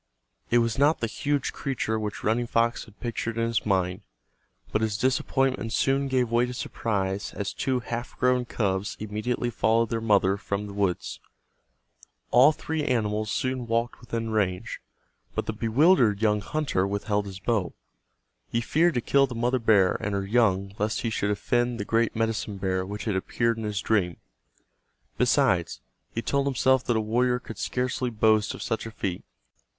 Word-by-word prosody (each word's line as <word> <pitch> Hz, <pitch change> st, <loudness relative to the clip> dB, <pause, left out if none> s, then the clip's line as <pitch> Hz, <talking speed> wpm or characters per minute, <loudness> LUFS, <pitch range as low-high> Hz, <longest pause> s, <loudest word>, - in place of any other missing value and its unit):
It 120 Hz, -, +4 dB
was 115 Hz, +1 st, +1 dB
not 145 Hz, +3 st, +4 dB
the -, -, 0 dB
huge 140 Hz, +5 st, -1 dB
creature 110 Hz, -5 st, -2 dB
which 105 Hz, -1 st, -5 dB
Running 120 Hz, +3 st, +1 dB
Fox 115 Hz, +1 st, +1 dB
had 105 Hz, -, -19 dB
pictured 115 Hz, -1 st, -3 dB
in 115 Hz, -, +1 dB
his 115 Hz, -1 st, -1 dB
mind, 95 Hz, 0 st, +1 dB, 0.7 s
but 110 Hz, -, +1 dB
his 110 Hz, -2 st, 0 dB
disappointment 130 Hz, -1 st, 0 dB
soon 135 Hz, +2 st, +2 dB
gave 125 Hz, -3 st, +1 dB
way 120 Hz, +1 st, +3 dB
to 125 Hz, -, -6 dB
surprise 100 Hz, -4 st, -2 dB
as 100 Hz, -2 st, -3 dB
two 130 Hz, -2 st, -1 dB
half 120 Hz, 0 st, -5 dB
grown 125 Hz, -1 st, +2 dB
cubs 100 Hz, -4 st, -2 dB
immediately 110 Hz, +3 st, -2 dB
followed 115 Hz, +1 st, +2 dB
their 115 Hz, -1 st, -1 dB
mother 100 Hz, -3 st, +3 dB
from 100 Hz, 0 st, -3 dB
the 100 Hz, -, -8 dB
woods. 100 Hz, -3 st, -1 dB, 1.1 s
All 130 Hz, +5 st, +7 dB
three 160 Hz, 0 st, -3 dB
animals 110 Hz, -5 st, 0 dB
soon 130 Hz, 0 st, -2 dB
walked 115 Hz, +1 st, -1 dB
within 115 Hz, -2 st, -4 dB
range, 95 Hz, -4 st, -1 dB, 0.5 s
but -, -, -1 dB
the 110 Hz, -, -2 dB
bewildered 115 Hz, -, +3 dB
young 105 Hz, -1 st, +2 dB
hunter 135 Hz, -9 st, -1 dB
withheld 100 Hz, 0 st, -1 dB
his 95 Hz, -1 st, -8 dB
arrow. 110 Hz, -7 st, 0 dB, 0.7 s
He 115 Hz, -, 0 dB
feared 160 Hz, +7 st, +2 dB
to 120 Hz, -, +1 dB
kill 135 Hz, +3 st, +3 dB
the 125 Hz, -, -7 dB
mother 120 Hz, +2 st, +1 dB
bear 105 Hz, -5 st, +4 dB
and 105 Hz, -2 st, -2 dB
her 100 Hz, 0 st, -1 dB
young 100 Hz, -3 st, +2 dB
lest 105 Hz, +1 st, 0 dB
he 115 Hz, -, -1 dB
should 105 Hz, -1 st, -1 dB
offend 120 Hz, +4 st, 0 dB
the 100 Hz, -, -3 dB
great 115 Hz, +1 st, +1 dB
medicine 110 Hz, -2 st, -1 dB
bear 95 Hz, -1 st, -1 dB
which 105 Hz, +1 st, -6 dB
had 105 Hz, -4 st, 0 dB
appeared 115 Hz, +4 st, 0 dB
in 110 Hz, -, -4 dB
his 105 Hz, -2 st, -2 dB
dream. 90 Hz, -6 st, +1 dB, 1.0 s
Besides, -, -, +2 dB, 0.3 s
he 115 Hz, -, -3 dB
told 140 Hz, 0 st, 0 dB
himself 130 Hz, -1 st, +3 dB
that 120 Hz, -, +1 dB
a -, -, +1 dB
warrior 125 Hz, +3 st, +1 dB
could 110 Hz, -4 st, -9 dB
scarcely 125 Hz, 0 st, -1 dB
boast 110 Hz, -1 st, +2 dB
of -, -, -7 dB
such 115 Hz, 0 st, -2 dB
a -, -, -7 dB
feat. 95 Hz, -4 st, -4 dB
115 Hz, 175 wpm, -26 LUFS, 105-125 Hz, 1.1 s, All